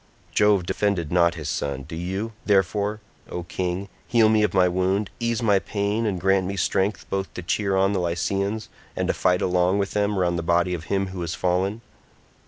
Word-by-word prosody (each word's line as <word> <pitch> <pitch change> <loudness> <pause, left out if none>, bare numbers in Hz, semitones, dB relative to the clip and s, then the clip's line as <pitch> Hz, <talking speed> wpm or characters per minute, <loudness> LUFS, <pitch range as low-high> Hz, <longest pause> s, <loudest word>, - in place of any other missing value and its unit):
Jove 105 -3 +3
defended 95 -5 -1
not 85 -1 +3
his 80 -4 -6
son, 70 -2 -2
do 80 +4 -8
you, 95 +6 -3
therefore, 105 +2 +1 0.3
O 90 - -4
king, 90 +2 -3 0.2
heal 115 -2 +4
me 110 -1 +4
of 105 -3 +2
my 90 -1 +4
wound, 95 +3 0
ease 115 0 -1
my 100 -3 +4
pain 105 +3 -1
and 95 -4 -1
grant 95 +1 +2
me 100 +1 -4
strength 100 +2 0
both 95 0 -2
to 90 - -5
cheer 100 +2 0
on 95 +1 +3
the 95 - 0
Lycians 100 +5 -1 0.3
and - - -1
to - - +3
fight 90 0 +1
along 90 +1 +2
with 100 -1 -1
them 105 -1 0
round 85 -2 +1
the - - -1
body 85 +2 +2
of 85 -2 -5
him 95 +1 -1
who 95 -1 -6
has 85 0 -3
fallen." 95 +5 0
95 Hz, 200 wpm, -24 LUFS, 90-100 Hz, 0.3 s, heal